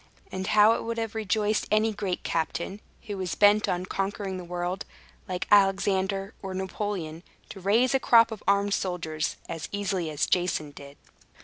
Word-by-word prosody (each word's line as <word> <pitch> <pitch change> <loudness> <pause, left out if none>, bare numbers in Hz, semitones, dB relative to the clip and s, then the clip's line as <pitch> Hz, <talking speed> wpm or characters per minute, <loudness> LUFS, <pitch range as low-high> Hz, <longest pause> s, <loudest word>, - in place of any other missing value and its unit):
And 190 0 -4
how 210 +1 +6
it - - -3
would 230 0 -3
have 225 -1 -3
rejoiced 215 0 0
any 215 +1 +2
great 195 -3 -3
captain, 170 +5 -2 0.2
who 205 -3 -5
was 180 -3 -2
bent 205 +1 +4
on 180 +1 -1
conquering 195 0 -3
the 180 - -6
world, 175 +2 -3 0.4
like 180 -2 -3
Alexander 195 0 +3
or 190 -1 -5
Napoleon, 190 -4 -4 0.3
to 195 - -9
raise 225 +7 +3
a 270 - +3
crop 230 -2 +5
of 220 - -6
armed 200 0 +3
soldiers 170 -5 -2
as 165 - -5
easily 195 -4 -2
as 150 -1 0
Jason 175 -5 0
did! 140 0 -12
195 Hz, 170 wpm, -27 LUFS, 180-210 Hz, 0.4 s, how